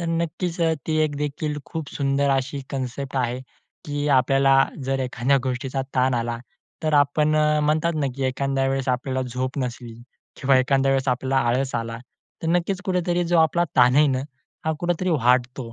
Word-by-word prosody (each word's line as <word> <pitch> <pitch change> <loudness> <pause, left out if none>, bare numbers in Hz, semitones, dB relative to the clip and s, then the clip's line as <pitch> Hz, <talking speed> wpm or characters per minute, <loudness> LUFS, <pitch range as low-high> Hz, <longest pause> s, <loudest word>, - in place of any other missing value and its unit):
तर 170 - -3
नक्कीच 170 +1 -2
अ, 165 -1 +3
ती 155 -1 0
एक 145 -2 -3
देखील 150 +1 -3
खूप 160 -4 -6
सुंदर 140 0 +1
अशी 135 +1 -1
कन्सेप्ट 135 0 -4
आहे 125 0 -1 0.4
की 145 0 -3
आपल्याला 135 +1 +4 0.2
जर 135 +1 -1
एखाद्या 125 +1 +1
गोष्टीचा 130 +1 -2
ताण 130 0 +2
आला, 115 0 -2 0.4
तर 155 -1 +1
आपण 150 +2 +3
अ, 150 0 +3
म्हणतात 155 +3 +1
ना 140 - +1
की 135 - -2
एखाद्या 135 +1 0
वेळेस 135 -1 -1
आपल्याला 130 +1 -1
झोप 130 +3 -3
नसली 120 -2 -4 0.5
किंवा 135 -1 +4
एखाद्या 135 +1 +2
वेळेस 135 0 0
आपल्याला 130 +2 0
आळस 130 +2 0
आला, 115 0 -3 0.4
तर 165 - -1
नक्कीच 175 +3 0
कुठेतरी 175 -2 0
जो 170 0 +2
आपला 160 +2 +3
ताण 125 0 +6
आहे 150 +1 +6
ना 130 -2 +1 0.5
हा 160 - +1
कुठेतरी 175 +1 0
वाढतो. 125 -3 +1
135 Hz, 175 wpm, -23 LUFS, 130-155 Hz, 0.5 s, ताण